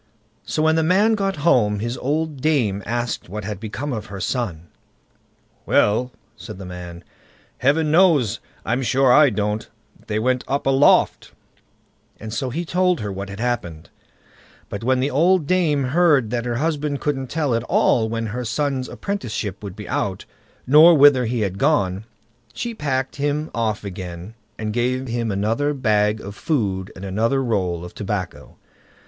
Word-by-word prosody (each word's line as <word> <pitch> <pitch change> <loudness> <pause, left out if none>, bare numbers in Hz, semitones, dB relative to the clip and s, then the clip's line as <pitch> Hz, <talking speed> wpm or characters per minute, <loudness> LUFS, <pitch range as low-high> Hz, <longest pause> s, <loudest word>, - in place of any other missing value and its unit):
So 155 - -1
when 160 0 +3
the - - +3
man 190 +7 +3
got 195 -2 0
home, 105 -9 +3
his 120 +4 -3
old 150 +2 -2
dame 120 -11 +1
asked 120 -4 -3
what 105 +2 -5
had 100 -1 -5
become 120 +6 -4
of 110 -2 -5
her 100 -1 -7
son. 95 -8 -2 1.0
"Well", 120 +5 +2 0.2
said 110 -5 -9
the 95 - -8
man, 90 -1 -9 0.6
"Heaven 150 +3 +2
knows, 160 - +4 0.3
I'm 120 +5 0
sure 130 +1 +3
I 150 0 +7
don't. 105 0 -2 0.4
They 105 - -1
went 125 +3 0
up 140 +1 -1
aloft"; 135 +1 +3 0.9
and 110 0 -7
so 130 +3 -2
he 170 +8 -3
told 180 -1 +1
her 105 -1 -3
what 100 +1 -6
had 100 +1 -8
happened. 110 -10 -3 0.8
But 100 - -6
when 130 +1 +2
the 140 +3 0
old 170 +4 +3
dame 155 -4 +2
heard 140 -4 +3
that 120 -1 -2
her 120 -1 -2
husband 150 0 -1
couldn't 135 -3 -2
tell 145 -1 -1
at 115 - +1
all 110 -2 +2
when 115 0 -2
her 125 +1 -3
son's 130 +3 -2
apprenticeship 120 - -4
would 100 -3 -7
be 105 -1 -9
out, 95 -1 -2 0.4
nor 155 +5 +7
whither 140 -3 +6
he 115 0 -1
had 100 -2 -2
gone, 105 -10 +1 0.5
she 235 0 -4
packed 135 -8 -2
him 145 +2 -1
off 110 -3 -1
again, 90 0 -7 0.2
and 105 -1 -3
gave 125 +2 -1
him 115 -1 -2
another 115 +9 0
bag 105 -4 +1
of 100 - -8
food 100 - -1
and 95 - -8
another 115 +8 0
roll 90 -8 -1
of 90 - -10
tobacco. - - -5
120 Hz, 165 wpm, -21 LUFS, 105-145 Hz, 1.0 s, I